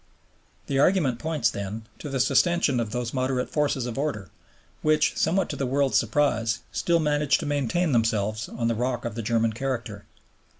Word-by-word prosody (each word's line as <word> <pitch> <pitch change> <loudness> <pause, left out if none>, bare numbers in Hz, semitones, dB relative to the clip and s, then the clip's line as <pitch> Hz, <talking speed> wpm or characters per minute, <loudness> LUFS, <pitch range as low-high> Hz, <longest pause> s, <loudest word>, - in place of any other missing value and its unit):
The 135 -1 -1
argument 140 -7 +3
points, 150 -7 0
then, 100 +3 -5 0.2
to 150 - -6
the 135 -1 -2
sustentation 140 0 +3
of 115 -2 -2
those 125 0 -3
moderate 130 -1 -1
forces 145 -4 0
of 120 +1 -4
order, 105 - -3 0.5
which, 155 0 +2
somewhat 185 +4 +1
to - - -3
the 135 - -2
world's 135 +1 +2
surprise, 115 -2 0
still 170 -1 +1
manage 150 -2 +2
to 160 - -5
maintain 145 +4 0
themselves 110 -2 0
on 115 -1 -2
the 115 - +2
rock 120 +1 -2
of 120 - -3
the 115 - -4
German 115 0 +1
character. 115 -4 -4
130 Hz, 175 wpm, -25 LUFS, 115-145 Hz, 0.5 s, argument